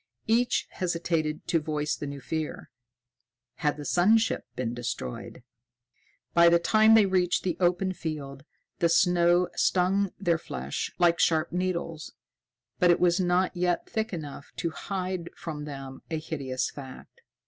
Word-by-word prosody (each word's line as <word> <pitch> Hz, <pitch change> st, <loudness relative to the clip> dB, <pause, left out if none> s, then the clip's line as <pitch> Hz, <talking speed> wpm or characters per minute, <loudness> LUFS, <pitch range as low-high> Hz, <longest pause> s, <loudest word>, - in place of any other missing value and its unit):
Each 235 Hz, +2 st, +2 dB
hesitated 165 Hz, -4 st, -2 dB
to 165 Hz, -, +3 dB
voice 150 Hz, -1 st, -2 dB
the 145 Hz, -, -6 dB
new 140 Hz, -1 st, -7 dB
fear: 160 Hz, +2 st, -4 dB, 0.9 s
had 150 Hz, 0 st, 0 dB
the 145 Hz, -, -7 dB
sun 185 Hz, +9 st, +4 dB
ship 225 Hz, -, -1 dB
been 120 Hz, -2 st, -2 dB
destroyed? 120 Hz, -, -5 dB, 0.9 s
By 170 Hz, 0 st, +7 dB
the 170 Hz, -, +5 dB
time 215 Hz, +5 st, +5 dB
they 220 Hz, -2 st, +6 dB
reached 185 Hz, -2 st, +1 dB
the 180 Hz, -3 st, -1 dB
open 180 Hz, +1 st, +1 dB
field, 145 Hz, -5 st, -6 dB, 0.4 s
the 170 Hz, -, +3 dB
snow 175 Hz, +1 st, +4 dB
stung 190 Hz, +2 st, +2 dB
their 170 Hz, -4 st, +1 dB
flesh -, -, -4 dB
like 170 Hz, -1 st, +3 dB
sharp 160 Hz, -2 st, +2 dB
needles, 170 Hz, -3 st, -3 dB, 0.7 s
but 180 Hz, -, +4 dB
it 175 Hz, -, +5 dB
was 175 Hz, +1 st, +3 dB
not 180 Hz, 0 st, +1 dB
yet 175 Hz, 0 st, 0 dB
thick 220 Hz, 0 st, -2 dB
enough 150 Hz, -5 st, -7 dB
to 170 Hz, -, -2 dB
hide 185 Hz, -1 st, -4 dB
from 150 Hz, -3 st, -6 dB
them 135 Hz, -2 st, -8 dB
a 160 Hz, -, -1 dB
hideous 140 Hz, -5 st, -3 dB
fact. 130 Hz, -3 st, -11 dB
170 Hz, 150 wpm, -27 LUFS, 150-180 Hz, 0.9 s, By